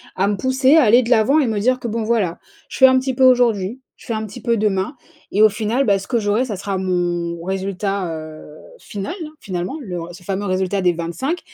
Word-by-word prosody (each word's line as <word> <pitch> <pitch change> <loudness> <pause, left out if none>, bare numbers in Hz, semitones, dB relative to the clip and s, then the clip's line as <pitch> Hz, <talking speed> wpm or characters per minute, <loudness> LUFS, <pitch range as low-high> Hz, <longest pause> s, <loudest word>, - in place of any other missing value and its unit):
à 190 +2 +1
me 205 - -1
pousser 260 +5 +3
à 315 - +6
aller 240 +3 +5
de 235 - -5
l'avant 250 +6 +4
et 260 - 0
me 215 -2 -1
dire 255 +4 +1
que 235 - -3
bon, 225 +1 -2
voilà, 215 -7 0 0.3
je - - -7
fais 265 - +7
un 260 0 +6
petit 260 0 -1
peu 260 +1 +3
aujourd'hui, 245 -2 +2 0.2
je - - -17
fais 230 - -3
un 220 0 -3
petit 210 - -10
peu 235 -2 +1
demain 205 +4 -1 0.4
et 205 - +2
au 215 - +8
final, 220 +5 -1
bah, 200 -2 +3
ce 200 - -10
que 240 - 0
j'aurai, 215 +4 +1
ça 215 -5 -4
sera 195 0 -3
mon 175 -2 -2
résultat, 195 -1 -2
heu, 155 -1 -10 0.2
final, 205 - -6
hein, 305 - -10
finalement, 180 +4 -4
le 180 -7 -5
ce 180 +1 -13
fameux 195 +2 -3
résultat 190 +1 -1
des 180 -1 +3
25 170 - -3
205 Hz, 240 wpm, -20 LUFS, 185-245 Hz, 0.4 s, au